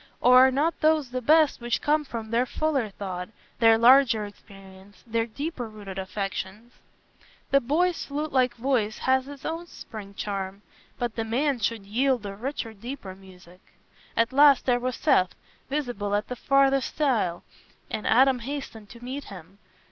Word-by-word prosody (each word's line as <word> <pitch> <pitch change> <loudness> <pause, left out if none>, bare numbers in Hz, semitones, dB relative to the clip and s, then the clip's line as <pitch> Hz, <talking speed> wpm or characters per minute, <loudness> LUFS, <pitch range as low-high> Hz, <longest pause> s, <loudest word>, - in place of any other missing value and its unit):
Or 255 +1 +7
are - - +1
not 300 +5 0
those 310 -4 +2
the 255 0 -3
best 310 0 +4
which 240 0 -1
come 300 +1 +1
from 225 -4 -6
their 240 +2 +1
fuller 280 -8 -1
thought, 185 -3 -6 0.3
their 225 -1 +6
larger 235 -2 +5
experience, 195 -1 -15
their 230 0 -1
deeper 260 0 -5
rooted 200 -3 -8
affections? 195 +4 -5 0.8
The 275 - +5
boy's 335 +8 +1
flutelike 280 -4 0
voice 230 -4 0
has 260 0 +1
its 285 -1 -10
own 330 +2 -4
spring 205 -9 -10
charm; 195 0 -5 0.3
but 240 -2 -3
the 225 - -1
man 255 +4 0
should 220 -1 -2
yield 245 +2 0
a 200 -1 -5
richer 235 0 -5
deeper 220 -2 -8
music. 185 -1 -17 0.6
At 230 +3 +2
last, 285 0 +6
there 245 -1 +2
was 255 +1 -2
Seth, 185 - +2 0.3
visible 245 -8 -2
at 205 - -2
the 250 - -3
farthest 275 +1 +2
stile, 225 - 0 0.5
and 215 - -3
Adam 260 +2 +4
hastened 235 -5 -7
to 235 0 -13
meet 270 +3 -5
him. 195 0 -12
240 Hz, 160 wpm, -26 LUFS, 205-275 Hz, 0.8 s, Or